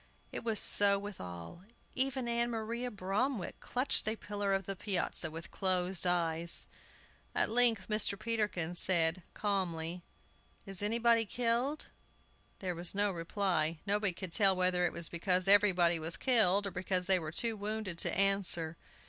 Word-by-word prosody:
It -, -, -6 dB
was 225 Hz, -3 st, -1 dB
so 200 Hz, -1 st, +5 dB
with 205 Hz, -1 st, -8 dB
all. 90 Hz, -, -9 dB, 0.3 s
Even 265 Hz, -1 st, -2 dB
Ann 235 Hz, 0 st, 0 dB
Maria 235 Hz, +2 st, -4 dB
Bromwick 205 Hz, +2 st, -3 dB
clutched 250 Hz, -3 st, -1 dB
a 220 Hz, -, 0 dB
pillar 205 Hz, -2 st, -4 dB
of 195 Hz, 0 st, -1 dB
the 195 Hz, -, -4 dB
piazza, 190 Hz, -3 st, -1 dB
with 165 Hz, +2 st, -9 dB
closed 185 Hz, -1 st, 0 dB
eyes. 170 Hz, -1 st, +2 dB, 0.7 s
At -, -, +1 dB
length 230 Hz, -4 st, +4 dB
Mr. 215 Hz, -2 st, +1 dB
Peterkin 210 Hz, -6 st, -2 dB
said, 175 Hz, -1 st, +2 dB
calmly, 180 Hz, -4 st, -3 dB, 0.6 s
"Is 195 Hz, -1 st, -4 dB
anybody 230 Hz, +2 st, +2 dB
killed?" 245 Hz, +6 st, -1 dB, 0.7 s
There 185 Hz, -2 st, -4 dB
was 175 Hz, +2 st, -2 dB
no 205 Hz, 0 st, +1 dB
reply. 170 Hz, -2 st, -2 dB
Nobody 205 Hz, -1 st, +1 dB
could 175 Hz, 0 st, -8 dB
tell 195 Hz, -2 st, +4 dB
whether 180 Hz, -1 st, +1 dB
it -, -, -5 dB
was 170 Hz, -, +1 dB
because 180 Hz, +2 st, 0 dB
everybody 185 Hz, -4 st, +4 dB
was 160 Hz, +2 st, -1 dB
killed, 205 Hz, -6 st, +3 dB
or 200 Hz, -, -4 dB
because 180 Hz, 0 st, -1 dB
they 190 Hz, 0 st, +3 dB
were 155 Hz, -2 st, -6 dB
too 230 Hz, +6 st, 0 dB
wounded 205 Hz, -4 st, -4 dB
to -, -, +1 dB
answer. 190 Hz, -5 st, +1 dB
195 Hz, 155 wpm, -32 LUFS, 175-215 Hz, 0.7 s, so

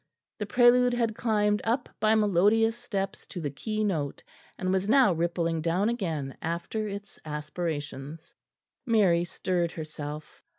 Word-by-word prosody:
The 210 Hz, -, -3 dB
prelude 245 Hz, +1 st, +5 dB
had 230 Hz, -2 st, +1 dB
climbed 210 Hz, -2 st, +1 dB
up 245 Hz, +3 st, 0 dB
by 215 Hz, +1 st, +4 dB
melodious 215 Hz, +2 st, +3 dB
steps 200 Hz, -5 st, -4 dB
to 180 Hz, -, -7 dB
the 145 Hz, -4 st, -3 dB
keynote, 190 Hz, -, -2 dB, 0.3 s
and 185 Hz, 0 st, -1 dB
was 190 Hz, +2 st, 0 dB
now 255 Hz, -6 st, +6 dB
rippling 165 Hz, -1 st, 0 dB
down 175 Hz, +6 st, +1 dB
again 160 Hz, -, -3 dB
after 170 Hz, +6 st, -3 dB
its 200 Hz, 0 st, -8 dB
aspirations. 150 Hz, -1 st, -5 dB, 0.5 s
Mary 200 Hz, -8 st, +3 dB
stirred 175 Hz, -1 st, -1 dB
herself. 155 Hz, -1 st, -7 dB
190 Hz, 130 wpm, -28 LUFS, 165-220 Hz, 0.5 s, now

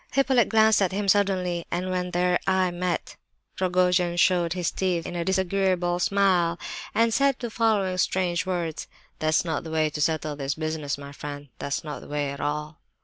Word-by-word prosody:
Hippolyte 265 Hz, -3 st, +3 dB
glanced 220 Hz, -1 st, +4 dB
at 190 Hz, -, +2 dB
him 200 Hz, +1 st, -2 dB
suddenly, 185 Hz, -3 st, +2 dB
and 180 Hz, +2 st, -2 dB
when 180 Hz, 0 st, -1 dB
their 180 Hz, 0 st, +1 dB
eyes 185 Hz, -1 st, +2 dB
met 180 Hz, 0 st, -3 dB, 0.4 s
Rogojin 180 Hz, -1 st, +2 dB
showed 175 Hz, -2 st, +3 dB
his 180 Hz, -3 st, -1 dB
teeth 180 Hz, -3 st, -1 dB
in 175 Hz, -, -5 dB
a 170 Hz, -, -1 dB
disagreeable 190 Hz, -1 st, +1 dB
smile, 180 Hz, -3 st, +2 dB, 0.4 s
and 230 Hz, 0 st, +3 dB
said 275 Hz, +1 st, +3 dB
the 240 Hz, -2 st, -5 dB
following 205 Hz, -5 st, +1 dB
strange 180 Hz, -1 st, +1 dB
words: 175 Hz, -4 st, -3 dB, 0.3 s
"That's 155 Hz, +2 st, +2 dB
not 160 Hz, -3 st, -2 dB
the 160 Hz, -, -7 dB
way 155 Hz, -1 st, +1 dB
to 150 Hz, -, -4 dB
settle 155 Hz, -1 st, 0 dB
this 140 Hz, 0 st, -3 dB
business, 155 Hz, -3 st, -3 dB
my 140 Hz, 0 st, -9 dB
friend; 145 Hz, 0 st, -8 dB
that's 140 Hz, -, -3 dB
not 150 Hz, -2 st, -6 dB
the -, -, -12 dB
way 145 Hz, -1 st, -2 dB
at 140 Hz, -, -7 dB
all." 150 Hz, +1 st, -3 dB
175 Hz, 185 wpm, -25 LUFS, 155-190 Hz, 0.4 s, glanced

